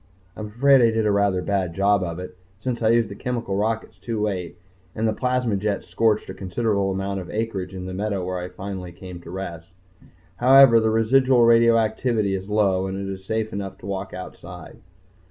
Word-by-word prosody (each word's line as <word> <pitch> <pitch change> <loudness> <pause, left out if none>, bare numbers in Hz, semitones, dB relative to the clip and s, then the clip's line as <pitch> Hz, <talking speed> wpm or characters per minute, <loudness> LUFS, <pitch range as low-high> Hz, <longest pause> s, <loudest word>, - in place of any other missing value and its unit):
I'm 105 +1 -6
afraid 135 +5 +4
I 115 - +5
did 110 -1 0
a 105 - +3
rather 100 -2 +1
bad 95 -4 -1
job 100 0 +3
of 85 -2 -4
it, 90 0 -8 0.2
since 120 +1 -3
I 110 - +3
used 115 -1 +3
the - - -6
chemical 115 -3 -3
rockets 110 +2 -2
too 115 -2 -4
late, 95 -5 -3 0.4
and 110 +1 0
the 110 - +1
plasma 125 -3 0
jets 100 0 -2
scorched 110 -2 +1
a - - -6
considerable 100 +1 -1
amount 95 +1 -2
of 90 - -8
acreage 100 -4 -3
in 90 -1 -6
the 95 - -6
meadow 100 -1 -2
where 90 0 -3
I 90 +1 -6
finally 95 -2 -7
came 90 0 -10
to 85 - -12
rest. 85 -3 -7 0.7
However, 130 -2 +7
the 110 0 +1
residual 120 +3 +3
radioactivity 115 -2 +3
is 95 +1 -4
low, 95 -3 +1
and 95 0 -4
it 95 0 -4
is 95 0 -10
safe 110 +1 -2
enough 100 -1 -5
to - - -13
walk 100 -1 -4
outside.... 90 0 -10
100 Hz, 200 wpm, -23 LUFS, 95-115 Hz, 0.7 s, However